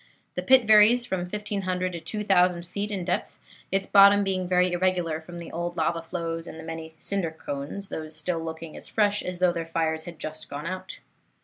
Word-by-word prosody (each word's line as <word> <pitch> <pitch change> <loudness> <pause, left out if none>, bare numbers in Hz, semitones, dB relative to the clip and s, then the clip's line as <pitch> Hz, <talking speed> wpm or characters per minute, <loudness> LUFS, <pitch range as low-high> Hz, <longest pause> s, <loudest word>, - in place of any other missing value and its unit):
The - - -2
pit 260 -3 +5
varies 215 +3 +6
from 190 -6 -2
1500 185 -2 -2
to 170 - -5
2000 180 -3 +2
feet 200 +4 -3
in 195 -4 -3
depth, 180 - -2 0.3
its 195 0 +1
bottom 200 +1 +7
being 185 -2 -1
very 180 0 +3
irregular 175 -3 0
from 175 +2 -10
the 170 - -8
old 175 +1 -4
lava 165 +1 0
flows 165 0 -4
and - - -8
the - - -8
many 160 0 -7
cinder 195 0 -1
cones, 160 +5 -6
these 155 0 -6
still 165 +1 -2
looking 160 0 -7
as - - -7
fresh 205 -1 +2
as 180 0 -4
though 180 0 +3
their 165 -1 -4
fires 160 -1 -1
had 170 -2 -8
just 155 0 -7
gone 145 +2 -6
out. 185 +1 -5
180 Hz, 200 wpm, -26 LUFS, 165-195 Hz, 0.3 s, bottom